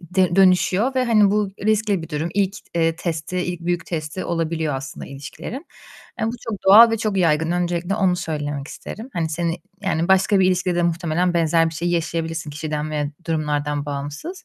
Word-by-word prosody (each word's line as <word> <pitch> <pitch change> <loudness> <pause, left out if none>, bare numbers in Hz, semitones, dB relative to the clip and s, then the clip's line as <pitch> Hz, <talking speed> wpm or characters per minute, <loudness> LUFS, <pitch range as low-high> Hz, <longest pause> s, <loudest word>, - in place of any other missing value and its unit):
d 180 0 0
dönüşüyor 195 +6 +4
ve 255 -1 +2
hani 215 -4 +4
bu 210 -1 +1 0.2
riskli 215 -4 +1
bir 160 - -8
durum. 155 +1 -2
İlk, 195 -1 +1 0.2
eee, 165 -1 +1
testi, 170 +1 -3
ilk 175 -1 -3
büyük 175 0 -2
testi 155 +2 -4
olabiliyor 160 -3 -1
aslında 135 +3 -6
ilişkilerin. 155 - -8 0.5
Eee, - - +1
bu 225 - 0 0.2
çok 205 -4 -5
doğal 225 +4 +9
ve 225 - +1
çok 210 -2 -1
yaygın. 165 -3 +2
Öncelikle 175 +1 -1
onu 190 -4 +2
söylemek 150 -4 -4
isterim. 225 +5 -8
Hani 165 -3 -1
seni 165 +1 -1 0.3
Yani 170 -4 0
başka 190 +2 +4
bir 185 - +4
ilişkide 185 -1 +1
de 175 - +1
muhtemelen 170 +1 0
benzer 165 0 +3
bir 165 - -8
şeyi 175 +2 -1
yaşayabilirsin 165 -2 -2
kişiden 150 +1 -4
veya 150 -1 -1 0.2
durumlardan 150 -2 -1
bağımsız. 145 - -6
170 Hz, 185 wpm, -22 LUFS, 155-190 Hz, 0.5 s, doğal